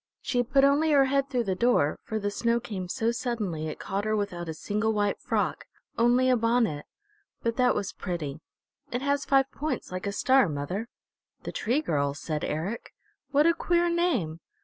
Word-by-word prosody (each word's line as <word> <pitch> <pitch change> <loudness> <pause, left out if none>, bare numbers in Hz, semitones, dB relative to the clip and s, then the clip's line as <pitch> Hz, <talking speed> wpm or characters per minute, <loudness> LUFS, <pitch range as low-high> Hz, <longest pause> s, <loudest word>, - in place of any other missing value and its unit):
She 245 - +1
put 270 +3 +3
only 285 +3 +4
her 275 -1 +6
head 275 +1 +1
through 250 -3 0
the 195 -4 -1
door, 185 -8 +2
for 220 - -4
the 205 -1 -2
snow 235 +3 +1
came 195 -5 -5
so 230 +2 0
suddenly 215 -10 -2
it 155 - -5
caught 195 +1 -3
her 215 0 0
without 180 -5 -3
a - - -2
single 210 +6 -1
white 205 -1 0
frock, - - -1 0.3
only 245 +2 +3
a 255 - +5
bonnet. 230 -10 +1 0.6
But 230 -1 0
that 250 -1 +3
was 200 -2 -2
pretty. 160 -6 -4 0.5
It 245 +2 -2
has 280 0 +1
five 270 0 +3
points 305 -8 -4
like 185 +2 -4
a - - 0
star, 260 +1 +3
mother." 155 +10 -3 0.6
"The - - -5
Tree 250 +7 0
Girl," 140 - 0
said 150 +1 -4
Eric. 175 +10 -4 0.3
"What 295 +1 +4
a 335 - +5
queer 345 0 +1
name! 340 - 0
230 Hz, 190 wpm, -27 LUFS, 185-265 Hz, 0.6 s, her